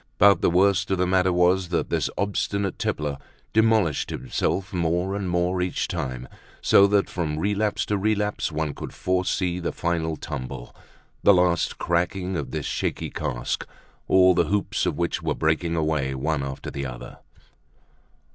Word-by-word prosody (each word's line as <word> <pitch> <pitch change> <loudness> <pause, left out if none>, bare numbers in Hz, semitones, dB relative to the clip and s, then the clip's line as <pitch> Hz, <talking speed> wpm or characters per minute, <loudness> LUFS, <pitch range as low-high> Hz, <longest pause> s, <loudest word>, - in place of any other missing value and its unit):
But 100 -3 +6
the - - +3
worst 95 +2 +3
of 95 - +1
the 90 - +2
matter 95 0 +2
was 90 +1 +2
that 85 - -1
this - - +1
obstinate 100 0 -1
tippler 75 -2 -2 0.3
demolished 110 -8 +2
himself 95 0 -2
more 90 +2 0
and 100 -2 -3
more 90 +1 0
each 90 0 -1
time 65 -1 -4 0.3
so 100 - +6
that 100 0 +2
from 80 -4 -3
relapse 105 +3 0
to 105 -1 -1
relapse 105 -3 0
one 75 -1 -2
could - - -8
foresee 90 -1 0
the 85 - -2
final 80 -2 -1
tumble, 65 -5 -7 0.5
the 100 - +6
last 90 -1 +2
cracking 90 +2 -1
of 75 -4 -3
this - - -4
shaky - - -2
cask, - - -3 0.4
all 95 -1 +6
the 90 - +2
hoops 105 +1 0
of - - -1
which - - -1
were - - -1
breaking 80 +2 0
away, 75 -4 0
one 75 +2 -1
after 70 -1 -5
the 70 -1 -4
other. - - -9
90 Hz, 160 wpm, -24 LUFS, 80-95 Hz, 0.5 s, But